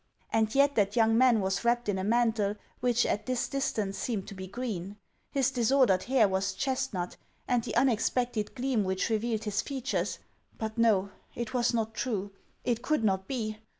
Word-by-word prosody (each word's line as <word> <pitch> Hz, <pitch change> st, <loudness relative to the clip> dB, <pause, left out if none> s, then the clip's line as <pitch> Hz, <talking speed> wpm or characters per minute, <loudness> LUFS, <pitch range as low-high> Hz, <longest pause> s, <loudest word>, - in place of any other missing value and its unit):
And 220 Hz, +1 st, +2 dB
yet 280 Hz, +1 st, +5 dB
that 205 Hz, -4 st, +1 dB
young 225 Hz, -1 st, +4 dB
man 240 Hz, -2 st, +5 dB
was 190 Hz, +2 st, -1 dB
wrapped 240 Hz, 0 st, +1 dB
in 195 Hz, -2 st, 0 dB
a -, -, -2 dB
mantle 220 Hz, -2 st, +2 dB, 0.2 s
which 245 Hz, -1 st, +2 dB
at 210 Hz, +1 st, -1 dB
this 255 Hz, -1 st, 0 dB
distance 215 Hz, -8 st, -2 dB
seemed 210 Hz, -6 st, -2 dB
to -, -, -8 dB
be 190 Hz, -1 st, -7 dB
green; 200 Hz, -3 st, -5 dB, 0.3 s
his 270 Hz, -1 st, +1 dB
disordered 245 Hz, -6 st, +3 dB
hair 250 Hz, -4 st, +4 dB
was 190 Hz, +1 st, -1 dB
chestnut, 210 Hz, -9 st, -2 dB, 0.3 s
and 245 Hz, -2 st, +2 dB
the -, -, -4 dB
unexpected 240 Hz, -2 st, +1 dB
gleam 255 Hz, -4 st, 0 dB
which 190 Hz, +4 st, -1 dB
re 220 Hz, -, +2 dB
vealed 220 Hz, -1 st, -2 dB
his 210 Hz, 0 st, 0 dB
features 265 Hz, -1 st, -2 dB, 0.2 s
— -, -, -35 dB
But 220 Hz, -1 st, -4 dB
no; 210 Hz, -4 st, +3 dB, 0.2 s
it 235 Hz, 0 st, -4 dB
was 245 Hz, -1 st, +2 dB
not 225 Hz, -2 st, -1 dB
true. 205 Hz, -6 st, -2 dB, 0.3 s
It 235 Hz, -1 st, 0 dB
could 305 Hz, -3 st, 0 dB
not 190 Hz, -2 st, +1 dB
be 215 Hz, -5 st, -3 dB
225 Hz, 185 wpm, -29 LUFS, 205-245 Hz, 0.3 s, yet